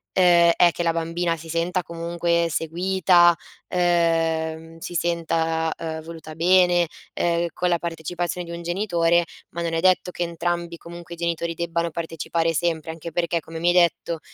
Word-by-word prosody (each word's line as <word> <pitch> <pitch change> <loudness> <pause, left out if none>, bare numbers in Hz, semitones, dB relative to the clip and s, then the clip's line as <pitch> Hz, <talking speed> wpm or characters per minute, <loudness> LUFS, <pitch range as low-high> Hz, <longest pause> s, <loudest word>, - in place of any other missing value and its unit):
ehm, 175 -2 +6
è 175 - +6
che 175 - -3
la 165 - +2
bambina 165 +1 -1
si 165 +1 -11
senta 170 +3 0
comunque 170 0 -1
seguita, 175 +2 +3 0.3
ehm, 165 -2 0
si 165 - -7
senta, 165 -1 0
ehm, 160 -1 -5
voluta 160 -1 -9
bene, 175 0 +4 0.3
ehm, 170 0 0
con 180 - -1
la 170 -1 +2
partecipazione 175 +2 -4
di 170 - -6
un 170 - -7
genitore, 175 -2 +1 0.2
ma 170 - -5
non 165 -1 -2
è 165 - +1
detto 185 0 +3
che 175 - -8
entrambi 170 0 -3
comunque 170 0 -10
i - - -23
genitori 170 0 -2
debbano 170 0 -1
partecipare 165 0 -2
sempre, 160 -1 -1
anche 165 +1 -8
perché, 170 +1 0
come 165 +1 -9
mi 170 +2 +2
hai - - +4
detto, 170 -1 +2
170 Hz, 165 wpm, -23 LUFS, 165-175 Hz, 0.3 s, ehm